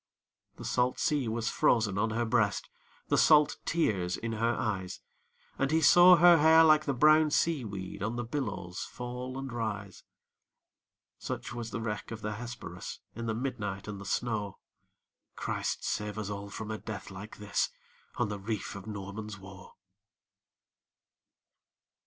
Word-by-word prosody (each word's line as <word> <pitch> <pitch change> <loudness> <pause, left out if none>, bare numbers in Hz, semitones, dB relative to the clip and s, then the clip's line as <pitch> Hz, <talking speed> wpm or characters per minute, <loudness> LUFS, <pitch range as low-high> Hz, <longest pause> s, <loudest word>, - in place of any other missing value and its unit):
The - - -9
salt 125 +1 +1
sea 145 -5 +1
was 115 0 -1
frozen 105 -5 +2
on 110 +2 +1
her 115 +2 -1
breast, 110 -3 +1 0.4
The - - +3
salt 150 -1 +5
tears 95 - 0
in 115 - -4
her 115 +1 0
eyes; 95 -4 -3 0.6
And 135 - +1
he 160 +2 +3
saw 175 +3 +8
her 170 -1 +7
hair 160 +2 +7
like 155 -1 +5
the 140 - 0
brown 155 +4 +5
sea 155 -2 +1
weed 95 -2 -6
On 110 +4 -2
the 120 - -2
billows 115 -8 -4
fall 125 +1 -6
and 135 -2 -5
rise. 105 -5 -4 1.2
Such - - -5
was 120 -2 -5
the 115 - -4
wreck 105 -2 -4
of 115 -1 -7
the 105 0 -3
Hesperus, 120 -7 -7 0.2
In 115 +1 -5
the 110 - -1
midnight 105 -6 -4
and 100 -2 -6
the - - -9
snow! 105 -2 -2 0.8
Christ - - -3
save 105 0 -2
us 105 -1 -3
all 100 0 -6
from 110 +1 -6
a 110 - -4
death 105 -3 -7
like 95 +3 -9
this, 105 -1 0 0.5
On - - 0
the 105 -1 -5
reef 105 +1 -4
of 100 +1 -9
Norman's 105 0 -6
Woe! 95 -1 -13
110 Hz, 160 wpm, -30 LUFS, 100-125 Hz, 1.2 s, saw